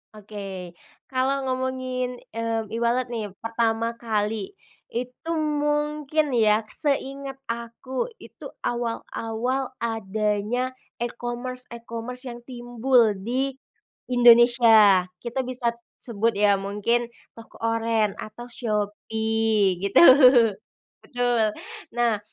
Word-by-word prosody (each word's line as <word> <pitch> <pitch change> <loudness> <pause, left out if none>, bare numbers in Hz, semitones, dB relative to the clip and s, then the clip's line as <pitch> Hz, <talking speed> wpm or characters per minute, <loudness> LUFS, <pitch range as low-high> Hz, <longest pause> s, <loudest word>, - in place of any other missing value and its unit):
Oke. 195 -4 -8 0.3
Kalau 265 +1 0
ngomongin, 255 -1 -2 0.2
mmm, 225 -1 -2
e-wallet 235 +3 0
nih, 220 -4 -4
pertama 230 0 -1
kali, 215 - -2 0.4
itu 250 +7 -5 0.3
mungkin 295 -1 0
ya 215 -1 +3 0.2
seinget 275 -1 -2
aku, 235 - -4
itu - - -14 0.2
awal-awal 240 +2 -3
adanya 220 +3 -1 0.2
e-commerce, 240 +1 -4
e-commerce 235 +2 -7
yang 240 -1 -8
timbul 240 -2 +2
di 260 +3 -1 0.5
Indonesia. 235 -6 +6
Kita 245 +2 -3
bisa 245 -2 -1 0.3
sebut 230 -1 0
ya 205 -1 +5
,mungkin 210 +5 -1 0.2
toko 230 -1 -14
oren 225 -2 +1
atau 215 +3 -8
Shopee, 220 -2 0
gitu, 200 0 +4 1.0
betul. 245 -3 +1 0.5
Nah, 235 -3 +2
235 Hz, 90 wpm, -24 LUFS, 220-250 Hz, 1.0 s, Indonesia